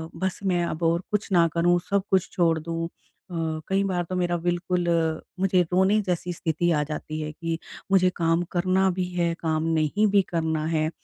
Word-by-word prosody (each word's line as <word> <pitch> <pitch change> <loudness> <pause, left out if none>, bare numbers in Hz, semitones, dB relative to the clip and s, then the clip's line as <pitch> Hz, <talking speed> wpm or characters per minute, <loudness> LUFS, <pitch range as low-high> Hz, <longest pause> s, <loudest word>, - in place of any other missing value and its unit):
बस 190 -1 -2
मैं 180 -3 +1
अब 170 0 -4
और 165 +1 +2
कुछ 210 -1 -1
ना 170 -3 +5
करूँ 175 +1 +3
सब 200 -1 +2
कुछ 190 -2 +2
छोड़ 165 -3 +2
दूँ। 165 +1 -3
अ, - - -16 0.8
कई 195 +1 +1
बार 185 -3 0
तो 185 - -2
मेरा 175 -1 0
बिल्कुल 175 +1 -1 0.5
मुझे 185 -1 +3
रोने 190 +4 +4
जैसी 180 0 -1
स्थिति 170 +1 0
आ 150 -2 +2
जाती 155 +1 -4
है 155 0 -4
कि 165 +1 -3 0.3
मुझे 185 -1 +5
काम 165 0 +1
करना 185 +2 +2
भी 185 - 0
है, 170 -1 +1
काम 160 -1 0
नहीं 165 +6 +2
भी 200 -1 +4
करना 160 -2 -1
है 155 -1 +1
175 Hz, 190 wpm, -25 LUFS, 165-185 Hz, 0.8 s, ना